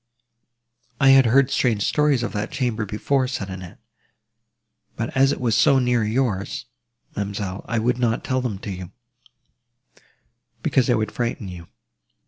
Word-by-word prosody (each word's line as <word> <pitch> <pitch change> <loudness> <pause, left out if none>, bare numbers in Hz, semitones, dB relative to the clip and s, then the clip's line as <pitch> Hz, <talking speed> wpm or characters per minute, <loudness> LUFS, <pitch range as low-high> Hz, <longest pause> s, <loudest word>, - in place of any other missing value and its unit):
"I 135 -2 +5
had 135 -2 +7
heard 135 +3 +4
strange 110 -5 +1
stories 150 -3 +2
of 120 - -3
that 105 +1 -2
chamber 120 -6 -2
before," 130 +6 0
said 100 -7 -4
Annette: 95 -1 -9 1.2
"but 115 +4 -4
as 135 +1 +4
it - - -3
was 120 -3 0
so 140 - +5
near 125 -3 +2
yours, 110 -3 -1 0.5
ma'amselle, 100 -1 -4
I 115 - -1
would 120 +2 +1
not 120 -2 0
tell 130 0 0
them 120 -6 -3
to 100 - -4
you, 90 -2 -7 1.7
because 130 -3 +2
they 120 - +3
would 110 -2 -1
frighten 120 -4 -3
you. 85 -2 -9
115 Hz, 150 wpm, -23 LUFS, 105-130 Hz, 1.7 s, had